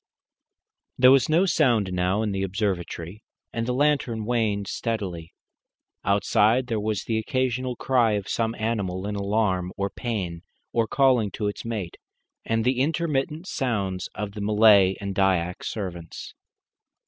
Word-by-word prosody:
There 125 0 +7
was 135 0 +4
no 170 +5 +4
sound 120 - +2
now 90 +4 +1
in 105 - -1
the 95 0 -2
observatory, 95 -1 -3 0.3
and 115 0 -2
the - - 0
lantern 130 -5 +1
waned 110 -4 0
steadily. 95 -9 -4 0.7
Outside 105 +4 +3
there 115 -3 -2
was 105 -1 -2
the 110 -1 -1
occasional 130 +2 -1
cry 120 -3 +2
of 100 -1 -2
some 115 0 -1
animal 100 -5 -2
in 105 0 -3
alarm 100 -3 0
or 100 0 -2
pain, 95 -9 -4 0.3
or 115 -1 +2
calling 125 -4 +3
to 105 - -2
its 105 - -4
mate, 105 -7 -4 0.5
and 115 0 0
the 125 0 +2
intermittent 155 +1 -1
sounds 100 - -2
of 105 -1 -4
the 105 0 -7
Malay 105 -2 +5
and 100 -1 -4
Dyak 95 -2 +1
servants. 90 -6 -6
110 Hz, 145 wpm, -25 LUFS, 95-120 Hz, 0.7 s, There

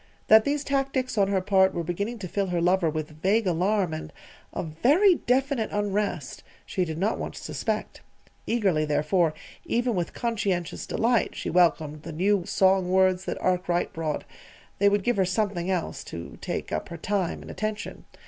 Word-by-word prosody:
That 220 0 +8
these 285 0 0
tactics 270 -2 -1
on 200 -2 +3
her 195 -1 +1
part 190 0 +3
were 170 - -1
beginning 200 +8 -3
to - - -4
fill 195 +2 -1
her 175 -1 -1
lover 175 0 +3
with 155 0 -5
vague 210 +5 +2
alarm 185 0 +1
and 155 - -6 0.4
a - - -3
very 275 - +4
definite 265 -5 0
unrest, 205 -7 -2 0.2
she 185 - -1
did 160 -2 -5
not 200 +6 0
once - - -5
suspect. - - -3 0.5
Eagerly, 195 -9 +2
therefore, 155 +2 +1 0.3
even 240 +1 0
with 175 -4 -2
conscientious 200 -7 -2
delight 235 0 +1
she - - -4
welcomed 160 -4 +2
the 160 - -8
new 185 +2 +1
song 190 -1 +3
words 185 0 +3
that - - -3
Arkwright 180 -1 0
brought 160 -2 -2 0.6
they 200 +1 +5
would 205 -1 +1
give 245 0 +1
her 190 - +3
something 185 -1 -1
else 180 -3 -2
to 85 0 -8
take - - -4
up - - -3
her 170 - -6
time 190 0 -2
and - - -9
attention. 215 0 -4
190 Hz, 175 wpm, -26 LUFS, 170-215 Hz, 0.6 s, That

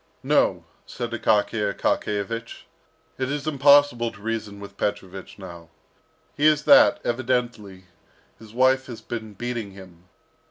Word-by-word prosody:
"No," - - +1 0.2
said 120 -1 -6
Akaky 110 -1 0
Akakiyevich, 115 +3 -3 0.6
"it 130 -1 -2
is 145 0 -4
impossible 140 -5 +4
to 105 - -16
reason 105 -2 -5
with 100 0 -11
Petrovich 95 -2 -5
now. 85 -4 -11 0.7
He 150 - +3
is 150 -1 +3
that 285 +1 +6
evidently, 120 -6 -3 0.5
his 110 -2 -14
wife 130 +2 +2
has 120 -4 -8
been 110 -2 -7
beating 120 -2 -5
him. 90 -3 -15
115 Hz, 125 wpm, -23 LUFS, 100-130 Hz, 0.7 s, that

